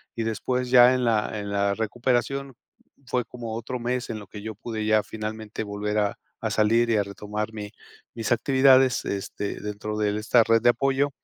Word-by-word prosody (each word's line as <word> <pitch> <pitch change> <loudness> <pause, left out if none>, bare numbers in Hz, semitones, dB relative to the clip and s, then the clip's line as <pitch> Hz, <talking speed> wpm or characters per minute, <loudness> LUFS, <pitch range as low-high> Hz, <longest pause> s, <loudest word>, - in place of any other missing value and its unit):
y 115 - -2
después, 125 +3 -2
ya 125 0 +8
en 125 - -1
la 110 -2 +1
en 100 0 -5
la 100 0 +1
recuperación, 125 +4 -1 0.5
fue 125 0 -1
como 115 -2 -7
otro 120 +2 -4
mes 125 +1 -2
en 110 - -3
lo 105 - -10
que 105 - -9
yo 110 +1 -6
pude 110 0 -5
ya, 110 -1 +3
finalmente, 110 0 -5
volver 105 0 -3
a 105 -1 0 0.2
a - - -2
salir 115 +2 +3
y 110 - +3
a - - +3
retomar 105 +2 -5
mi 105 -1 -7 0.4
mis 115 0 -4
actividades, 130 +1 +4
este, 100 +1 -4
dentro 105 +1 -5
de 105 -1 0
esta 115 +2 +4
red 115 0 +3
de 120 - +5
apoyo. 135 +3 +2
110 Hz, 190 wpm, -25 LUFS, 105-125 Hz, 0.5 s, ya